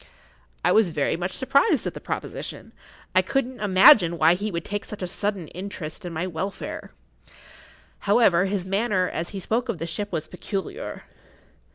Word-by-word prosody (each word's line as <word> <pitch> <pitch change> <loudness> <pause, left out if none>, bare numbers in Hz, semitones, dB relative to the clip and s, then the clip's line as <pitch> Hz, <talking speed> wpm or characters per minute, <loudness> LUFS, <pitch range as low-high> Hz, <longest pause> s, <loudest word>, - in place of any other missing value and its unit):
I - - +5
was 220 -4 +4
very 150 -3 0
much 180 +2 -3
surprised 280 - +2
at - - -2
the - - -9
proposition. - - -5 0.4
I - - +6
could 270 -2 0
not 250 -3 -8
imagine 185 -3 +7
why 160 +1 +5
he 205 +4 -2
should 170 -2 -4
take 205 0 -3
such 210 -3 -7
a - - -2
sudden 195 -2 -2
interest 180 -4 -6
in 175 - -4
my 165 +2 -2
welfare. 185 +2 -5 1.2
However, 200 -5 +5
his 195 -2 -2
manner 195 -1 +1
as 170 0 -3
he 200 - -5
spoke 230 +6 -1
of 220 - -1
the 165 - -4
ship 205 +5 -4
was 160 -3 -3
peculiar. 195 - -5
190 Hz, 175 wpm, -25 LUFS, 170-210 Hz, 1.2 s, imagine